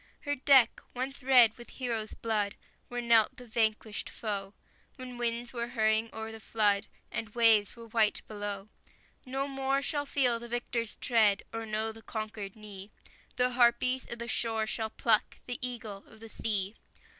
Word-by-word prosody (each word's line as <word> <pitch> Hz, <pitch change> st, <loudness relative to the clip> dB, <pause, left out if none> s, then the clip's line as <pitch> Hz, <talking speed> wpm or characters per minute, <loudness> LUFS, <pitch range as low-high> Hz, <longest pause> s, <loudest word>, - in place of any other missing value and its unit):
Her 290 Hz, -, -1 dB
deck, 265 Hz, -3 st, +5 dB
once 265 Hz, +3 st, -4 dB
red 250 Hz, -4 st, +6 dB
with 240 Hz, -, -11 dB
heroes' 230 Hz, -4 st, -3 dB
blood, 210 Hz, -3 st, -1 dB, 0.3 s
Where 245 Hz, -1 st, -3 dB
knelt 230 Hz, -2 st, +4 dB
the 250 Hz, -, -10 dB
vanquished 220 Hz, -2 st, 0 dB
foe, 200 Hz, -3 st, -4 dB, 0.4 s
When 255 Hz, -2 st, -8 dB
winds 235 Hz, +1 st, -1 dB
were 235 Hz, -1 st, -2 dB
hurrying 220 Hz, 0 st, +1 dB
o'er 220 Hz, 0 st, -5 dB
the 225 Hz, -, -9 dB
flood 210 Hz, -2 st, +1 dB, 0.2 s
And 225 Hz, 0 st, -4 dB
waves 225 Hz, -3 st, +5 dB
were 230 Hz, -1 st, -10 dB
white 220 Hz, -2 st, +1 dB
below, 205 Hz, -1 st, -5 dB, 0.6 s
No 270 Hz, +2 st, -1 dB
more 270 Hz, 0 st, 0 dB
shall 290 Hz, -1 st, -1 dB
feel 250 Hz, -5 st, +2 dB
the 235 Hz, 0 st, -9 dB
victor's 240 Hz, -1 st, -2 dB
tread, 215 Hz, -5 st, +3 dB
Or 225 Hz, 0 st, -4 dB
know 215 Hz, +1 st, -1 dB
the 225 Hz, 0 st, -12 dB
conquered 215 Hz, -3 st, -5 dB
knee; 205 Hz, -2 st, -10 dB, 0.5 s
The 250 Hz, 0 st, +2 dB
harpies 250 Hz, +1 st, +3 dB
of 235 Hz, -, -4 dB
the 235 Hz, 0 st, -5 dB
shore 225 Hz, -1 st, 0 dB
shall 220 Hz, 0 st, -2 dB
pluck 220 Hz, -1 st, +1 dB
The 245 Hz, -1 st, -4 dB
eagle 225 Hz, -5 st, -4 dB
of 220 Hz, -, -16 dB
the 225 Hz, 0 st, -10 dB
sea! 205 Hz, -3 st, 0 dB
225 Hz, 165 wpm, -30 LUFS, 215-245 Hz, 0.6 s, red